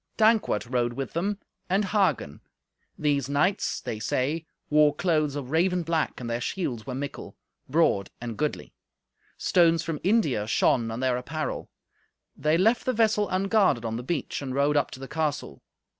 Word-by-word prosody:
Dankwart 220 - +3
rode 120 -1 0
with 135 +2 -5
them, 195 +5 -1 0.3
and 195 +3 +2
Hagen. 190 - 0 0.6
These 140 -3 0
knights, 150 +8 +1
they 110 - -4
say, 145 +9 -1 0.2
wore 150 -1 +4
clothes 155 -4 +1
of 140 -2 -5
raven 180 +2 +2
black, 165 -1 -1
and 120 - -5
their 120 +1 -2
shields 125 - -3
were 130 - -3
mickle, 140 +2 -6 0.3
broad 130 - +2
and 120 -2 -5
goodly. 150 +4 -3 0.6
Stones 165 -2 +3
from 160 -3 -3
India 160 - +2
shone 115 +1 +2
on 115 +2 -4
their 130 -1 +1
apparel. 155 +5 -4 0.7
They 155 +3 +2
left 225 +7 +3
the 255 - +1
vessel 215 -2 +2
unguarded 195 - +2
on 115 0 -2
the - - -4
beach, 145 +2 -3
and 130 -2 -4
rode 140 +2 +2
up 145 - +2
to - - -10
the 135 - -7
castle. 150 - -3
150 Hz, 165 wpm, -26 LUFS, 125-180 Hz, 0.7 s, wore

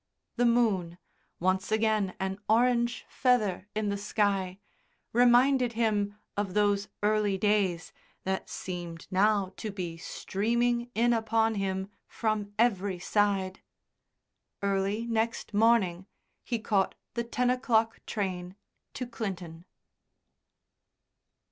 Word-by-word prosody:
The 245 0 +3
moon, 200 -8 +2 0.4
once 185 +3 0
again 215 -3 +1
an 190 +1 -2
orange 240 +1 +2
feather 210 -7 +1
in 215 -1 0
the 200 - -1
sky, 200 -3 0 0.6
reminded 245 +1 +5
him 210 -3 0 0.2
of 200 -2 -2
those 205 -1 +2 0.2
early 210 -2 +2
days 195 -4 +1 0.3
that 190 0 -2
seemed 175 -3 -6
now 195 0 +2
to 220 - -4
be 180 -5 -5
streaming 235 +7 -1
in 240 +2 +3
upon 225 0 +2
him 190 -2 -2 0.2
from 215 -2 -2
every 200 -5 +2
side. 195 0 0 1.0
Early 200 +3 0
next 230 -1 -1
morning 205 -5 +3 0.4
he 235 - -1
caught 205 -3 0 0.2
the 235 - -1
ten 245 +1 +1
o'clock 225 -3 +1
train 185 -3 -3 0.4
to 250 - -3
Clinton. 180 -8 -6
210 Hz, 110 wpm, -29 LUFS, 190-230 Hz, 1.0 s, reminded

